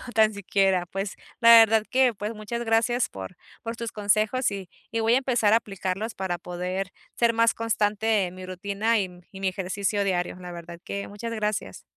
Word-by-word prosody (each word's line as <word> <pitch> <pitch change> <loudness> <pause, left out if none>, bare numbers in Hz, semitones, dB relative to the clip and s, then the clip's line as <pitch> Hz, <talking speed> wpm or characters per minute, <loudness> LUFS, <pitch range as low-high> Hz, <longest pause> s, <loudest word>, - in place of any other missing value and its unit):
tan 220 -1 +5
siquiera. 195 -2 +1
Pues 195 +1 -4 0.3
la 230 - +7
verdad 225 -1 +7
que, 255 -2 +4
pues, 210 +2 -4
muchas 225 +3 -4
gracias 230 +2 +2
por 95 -1 -8 0.3
por 230 +1 -5
tus 230 -1 -5
consejos, 215 +4 +1
y 195 -3 -6 0.2
y 230 - -1
voy 225 +1 +3
a - - +5
empezar 240 -5 +2
a 225 - +7
aplicarlos 195 +1 -4
para 185 -2 -2
poder 180 +2 -4 0.2
ser 235 -1 +3
más 230 0 +3
constante 215 -2 +1
en 180 0 -7
mi 185 0 -8
rutina 200 +4 0
y 195 - 0
m 180 -1 -13
y 190 - -10
mi 195 - +1
ejercicio 200 +2 -1
diario, 180 -2 -1
la 180 -1 -8
verdad 170 0 -9
que 200 0 -4
muchas 230 +3 -6
gracias. 210 -1 -3
205 Hz, 195 wpm, -26 LUFS, 185-225 Hz, 0.3 s, la